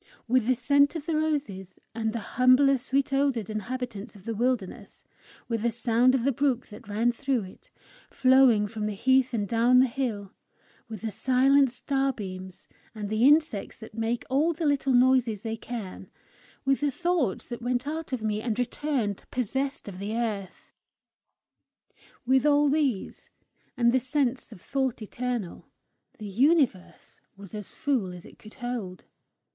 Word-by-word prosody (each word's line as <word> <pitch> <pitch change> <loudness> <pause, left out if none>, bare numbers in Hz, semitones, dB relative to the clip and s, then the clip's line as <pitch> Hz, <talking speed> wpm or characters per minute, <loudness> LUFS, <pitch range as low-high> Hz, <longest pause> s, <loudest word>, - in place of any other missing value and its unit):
With 245 -1 +2
the 255 - +3
scent 280 +5 +3
of 310 -3 -5
the 330 - -1
roses 275 - -2 0.2
and 220 -1 -2
the 230 - -3
humbler 255 +2 +5
sweet 275 +2 -1
odoured 270 -7 0
inhabitants 225 0 -5
of 195 -1 -15
the 230 - -2
wilderness; 225 -3 -3 0.4
with 230 -2 -2
the 235 - +2
sound 235 +2 +2
of 250 - 0
the 275 - +2
brook 260 -1 0
that 210 -2 -12
ran 220 +4 +1
through 255 -1 -1
it, 185 - -14 0.4
flowing 255 -5 +4
from 210 0 -4
the 210 - -3
heath 260 +4 +3
and 210 -4 -1
down 235 +3 +3
the 255 - +7
hill; 230 -6 -3 0.6
with 220 -3 -7
the 220 -1 -3
silent 265 +5 +3
starbeams, 235 -8 -3 0.3
and 210 -2 -5
the 220 +4 +3
insects 295 -8 +2
that 220 -1 -12
make 230 +2 -2
all 295 +6 +2
the 325 +1 -4
little 280 -2 +1
noises 245 -4 +3
they 225 -1 -3
can; 225 -4 -7 0.6
with 270 0 +2
the 290 - +2
thoughts 340 - -1
that 240 0 -7
went 245 +1 -1
out 315 +1 -5
of 250 -4 -3
me, 215 -1 -1
and 225 -1 -2
returned 245 -4 -2
possessed 265 +3 -2
of 190 -2 -8
the 205 +3 -4
earth; 205 -5 -4 1.5
with 260 +1 +3
all 295 0 +4
these, 275 -8 -1 0.5
and 235 -1 +4
the 260 - +4
sense 260 -1 -1
of - - -11
thought 265 -4 -2
eternal, 240 -3 -4 0.5
the 215 - -8
universe 250 - 0 0.2
was 200 0 -12 0.2
full 260 -11 -1
as 180 -1 -10
it - - -16
could 215 - -14
hold. 240 -8 -5
245 Hz, 160 wpm, -27 LUFS, 215-270 Hz, 1.5 s, the